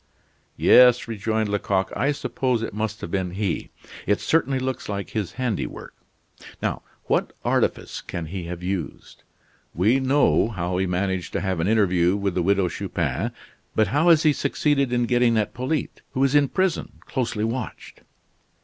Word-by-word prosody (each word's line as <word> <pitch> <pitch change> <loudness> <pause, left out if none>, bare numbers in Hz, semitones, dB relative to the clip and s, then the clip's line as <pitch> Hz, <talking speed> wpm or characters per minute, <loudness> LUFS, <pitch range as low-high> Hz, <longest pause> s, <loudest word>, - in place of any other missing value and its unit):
"Yes," 125 -1 +6
rejoined 110 0 -1
Lecoq, 95 -2 0
"I 140 +3 +1
suppose 130 -4 -1
it - - -4
must 110 +1 -3
have 85 - -6
been 95 -2 -1
he. 100 -6 -2 0.4
It 105 +1 +2
certainly 140 -4 +1
looks 130 -3 -3
like 100 -1 -4
his 105 -5 -3
handiwork 125 -5 -3 0.7
now, - - -2 0.2
what - - 0
artifice - - 0
can 85 - -5
he 90 +2 -5
have 85 +1 -6
used? 95 -2 -5 0.5
We 110 +10 +3
know 135 -3 +3
how 90 -4 -2
he 95 - +1
managed 90 0 -2
to - - -1
have 95 -3 -1
an 80 - 0
interview 95 -4 +3
with 100 -2 -1
the 90 - 0
Widow 95 +1 +2
Chupin, - - -2 0.4
but 110 - +3
how 160 +5 +3
has 160 -2 +6
he 155 -2 +5
succeeded 140 -2 +1
in 120 -1 +2
getting 120 -1 +3
at 105 - 0
Polyte, 130 +5 -3
who 130 - +1
is 135 0 +2
in 145 -1 +5
prison, 185 -3 -1
closely 120 -5 -2
watched?" 115 +3 -5
110 Hz, 165 wpm, -24 LUFS, 95-130 Hz, 0.7 s, Yes